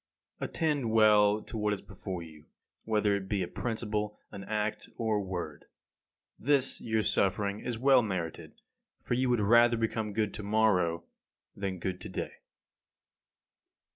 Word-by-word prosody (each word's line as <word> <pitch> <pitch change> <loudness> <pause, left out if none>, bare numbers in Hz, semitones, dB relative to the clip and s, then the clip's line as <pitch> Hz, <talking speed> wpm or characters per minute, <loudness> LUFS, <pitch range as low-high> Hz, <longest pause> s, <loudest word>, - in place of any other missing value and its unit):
22. - - -3
Attend 145 -8 0
well 105 -1 +5
to - - -9
what 105 0 +1
is 100 - -5
before 95 -2 -6
you, 80 -2 -14 0.4
whether 105 -2 +2
it 95 -1 -5
be 100 -3 0
a - - -3
principle, 105 -1 -3
an 100 - -8
act, 110 0 -2
or 110 -2 +1
a - - 0
word. 90 -6 -5 0.7
This 140 0 +2
your 110 -1 0
suffering 100 +1 +1
is 120 -2 -4
well 130 +1 +5
merited, 95 -7 -5 0.4
for - - -2
you 130 +1 +1
would 120 -2 +3
rather 120 +3 +5
become 110 -1 -1
good 105 -1 0
to - - -5
morrow 100 -5 +2 0.5
than 100 -1 -3
be 90 - -12
good 90 0 -3
to - - -7
day. - - -4
105 Hz, 160 wpm, -30 LUFS, 95-115 Hz, 0.7 s, well